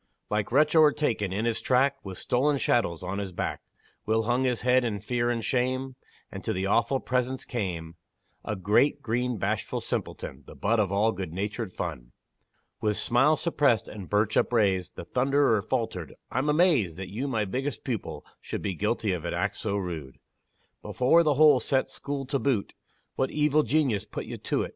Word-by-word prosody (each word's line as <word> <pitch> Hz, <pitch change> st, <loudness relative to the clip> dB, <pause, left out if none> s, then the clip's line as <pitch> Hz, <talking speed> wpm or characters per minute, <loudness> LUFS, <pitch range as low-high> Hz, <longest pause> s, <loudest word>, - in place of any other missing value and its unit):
Like 105 Hz, 0 st, -1 dB
wretch 150 Hz, +4 st, +3 dB
o'ertaken 145 Hz, -, +3 dB
in 105 Hz, +4 st, -1 dB
his 115 Hz, -1 st, 0 dB
track, 135 Hz, +2 st, +2 dB
With 95 Hz, -2 st, -7 dB
stolen 140 Hz, +4 st, +1 dB
chattels 90 Hz, -11 st, +1 dB
on 95 Hz, +2 st, -3 dB
his 100 Hz, -2 st, -4 dB
back, 85 Hz, -, -3 dB, 0.5 s
Will 110 Hz, +1 st, +2 dB
hung 120 Hz, +3 st, +1 dB
his 125 Hz, -2 st, 0 dB
head 125 Hz, +1 st, +3 dB
in 110 Hz, -4 st, -2 dB
fear 120 Hz, +3 st, -1 dB
and 115 Hz, -2 st, -1 dB
shame, 130 Hz, +1 st, -1 dB, 0.4 s
And -, -, -7 dB
to -, -, -1 dB
the 95 Hz, +1 st, -2 dB
awful 115 Hz, +6 st, +2 dB
presence 130 Hz, +1 st, -1 dB
came 85 Hz, -8 st, -4 dB, 0.5 s
A 110 Hz, -, -3 dB
great, 105 Hz, +10 st, +2 dB
green, 120 Hz, +1 st, -1 dB
bashful -, -, -2 dB
simpleton, -, -, -4 dB
The -, -, -11 dB
butt 115 Hz, 0 st, +1 dB
of 100 Hz, -3 st, +1 dB
all 105 Hz, +3 st, +3 dB
good 95 Hz, -5 st, -5 dB
natured 105 Hz, +3 st, -3 dB
fun. -, -, -6 dB, 0.7 s
With 105 Hz, -1 st, +1 dB
smile 135 Hz, +6 st, +3 dB
suppressed, 140 Hz, -, +2 dB
and 100 Hz, -4 st, -9 dB
birch 105 Hz, +1 st, +1 dB
upraised, 95 Hz, -6 st, +2 dB
The -, -, -7 dB
thunderer 130 Hz, -1 st, +2 dB
faltered -, -, -3 dB, 0.2 s
"I'm 130 Hz, +4 st, 0 dB
amazed 150 Hz, -, +3 dB
That 95 Hz, -1 st, -6 dB
you, 125 Hz, +7 st, -3 dB
my 110 Hz, -6 st, 0 dB
biggest 130 Hz, +8 st, -3 dB
pupil, 120 Hz, -6 st, -4 dB
should -, -, -5 dB
Be 100 Hz, -, -1 dB
guilty 105 Hz, +2 st, 0 dB
of 85 Hz, -3 st, -4 dB
an 85 Hz, -, -2 dB
act 100 Hz, 0 st, -1 dB
so 100 Hz, -2 st, -2 dB
rude! 80 Hz, -8 st, -5 dB, 0.6 s
Before 130 Hz, +7 st, +3 dB
the 150 Hz, -4 st, +2 dB
whole 150 Hz, -2 st, +6 dB
set 135 Hz, 0 st, 0 dB
school 140 Hz, -1 st, -4 dB
to 140 Hz, +1 st, -1 dB
boot 130 Hz, -8 st, 0 dB, 0.4 s
What 130 Hz, -, +1 dB
evil 150 Hz, 0 st, +2 dB
genius 130 Hz, -6 st, +1 dB
put -, -, -6 dB
you -, -, -6 dB
to't?" -, -, -1 dB
115 Hz, 180 wpm, -27 LUFS, 100-135 Hz, 0.7 s, whole